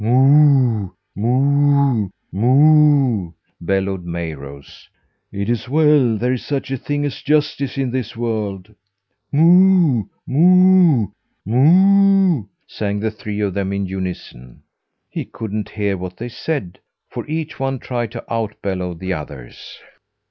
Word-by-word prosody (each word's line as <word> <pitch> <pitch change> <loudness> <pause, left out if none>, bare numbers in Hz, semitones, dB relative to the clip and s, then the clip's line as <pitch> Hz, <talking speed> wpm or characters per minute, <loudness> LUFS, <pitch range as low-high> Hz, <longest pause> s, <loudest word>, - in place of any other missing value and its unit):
"Moo, 130 -3 +4 0.3
moo, 140 0 +2 0.2
moo," 135 - +3 0.3
bellowed 95 +1 -2
Mayrose. 75 -5 -8 0.4
"It 100 0 -4
is 120 0 -2
well 145 -6 +3
there 125 +3 -1
is 125 - -4
such 140 -2 -4
a 135 - -1
thing 145 +3 -3
as 140 - -5
justice 145 -3 -1
in 135 -3 -1
this 120 -2 -4
world." 110 -4 -4 0.6
"Moo, 170 - +4 0.2
moo, 180 - +4 0.4
moo," 185 - +4 0.2
sang 105 -1 -4
the 110 +1 -2
three 105 -1 -6
of 100 -2 -1
them 100 0 -3
in 100 0 -2
unison. 90 -10 -7 0.4
He - - -5
couldn't 110 -1 -6
hear 100 -2 -2
what 90 0 -7
they 120 +1 -6
said, 120 - -5 0.3
for - - -5
each 155 0 -5
one 135 0 -2
tried 120 -3 -4
to 115 - -8
out 110 -2 -3
bellow 90 -3 -3
the 95 +3 -4
others. 70 -6 -10
120 Hz, 125 wpm, -18 LUFS, 100-145 Hz, 0.6 s, Moo